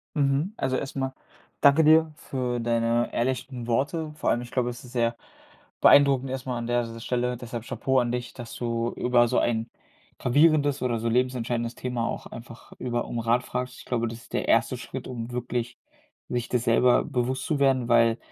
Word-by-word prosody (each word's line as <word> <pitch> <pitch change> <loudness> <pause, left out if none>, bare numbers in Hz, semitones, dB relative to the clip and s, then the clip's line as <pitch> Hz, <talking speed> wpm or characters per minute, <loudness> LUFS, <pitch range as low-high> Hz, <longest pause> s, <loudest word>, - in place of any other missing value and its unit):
Mhm. 145 +7 +1
Also 130 - 0
erst 135 - -5
mal 135 -1 -2 0.5
danke 140 +3 +6
dir 160 +1 +5
für 125 -4 -3
deine 115 0 0
ehrlichen 125 0 -2
Worte. 150 +6 -1
Vor - - -1
allem, 120 - +1
ich 120 - -10
glaube, 125 -1 0
es 120 +1 -8
ist 125 - -13
sehr 115 -1 +1 0.7
beeindruckend 135 -2 +6
erst 130 0 -4
mal 125 -2 -2
an 115 0 -4
der 120 0 +2
S 115 0 -7
Stelle. 125 0 -1
Deshalb 120 -1 -7
Chapeau 130 +2 0
an 120 -1 0
dich, 125 0 -4
dass 120 -2 -9
du 115 -1 -2
über 120 -1 +3
so - - +2
ein 115 -1 0 0.5
gravierendes 145 +1 +3
oder 120 -3 0
so 115 - -2
lebensentscheidendes 120 -1 0
Thema 125 -2 -2
auch - - -5
einfach 115 0 -11
über 120 -1 -2
um 120 - -4
Rat 120 +2 +1
fragst. 125 0 -4
Ich - - -12
glaube, 115 -2 -1
das 115 +1 -7
ist - - -18
der - - -1
erste - - +2
Schritt, - - -7
um 120 -1 -6
wirklich 120 0 -3 0.5
sich 120 -1 -2
das 125 -1 0
selber 120 +1 +4
bewusst 130 -1 -2
zu 150 -3 -1
werden, 130 -3 +2
weil 115 -1 +4
125 Hz, 195 wpm, -26 LUFS, 120-130 Hz, 0.7 s, danke